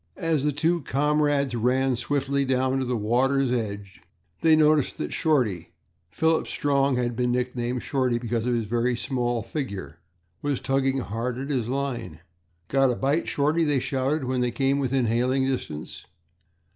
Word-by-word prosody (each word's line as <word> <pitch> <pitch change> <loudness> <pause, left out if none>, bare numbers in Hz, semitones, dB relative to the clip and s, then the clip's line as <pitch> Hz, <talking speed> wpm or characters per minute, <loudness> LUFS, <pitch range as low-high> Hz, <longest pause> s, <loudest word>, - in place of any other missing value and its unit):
As 160 -4 0
the 150 - +2
two 165 +4 +1
comrades 145 -1 +1
ran 125 +3 +1
swiftly 140 +2 0
down 130 0 +1
to 130 - -1
the 125 -1 -1
water's 130 +5 +1
edge, 100 -5 -4 0.4
they 160 -1 +6
noticed 155 -2 +3
that - - -4
Shorty 110 - 0 0.4
Philip 160 - +1
Strong 140 -2 +1
had 120 -1 -1
been 125 0 0
nicknamed 125 0 -2
Shorty 130 -3 0
because 120 0 -2
of 125 - +2
his 115 -2 -1
very 120 +3 0
small 120 -1 -1
figure 100 - -5 0.4
was 145 -3 -1
tugging 135 0 0
hard 115 +3 -3
at 135 +3 -4
his 125 -5 -1
line. 125 - -3 0.5
"Got 135 +3 +3
a 125 - 0
bite, 140 +6 0
Shorty?" 150 +4 +1
they 145 -3 +2
shouted, 135 +3 -1
when 130 0 -1
they 125 - +1
came 135 +4 +1
within 130 -2 +1
hailing 125 +4 +1
distance. 100 - -4
130 Hz, 160 wpm, -25 LUFS, 120-140 Hz, 0.5 s, they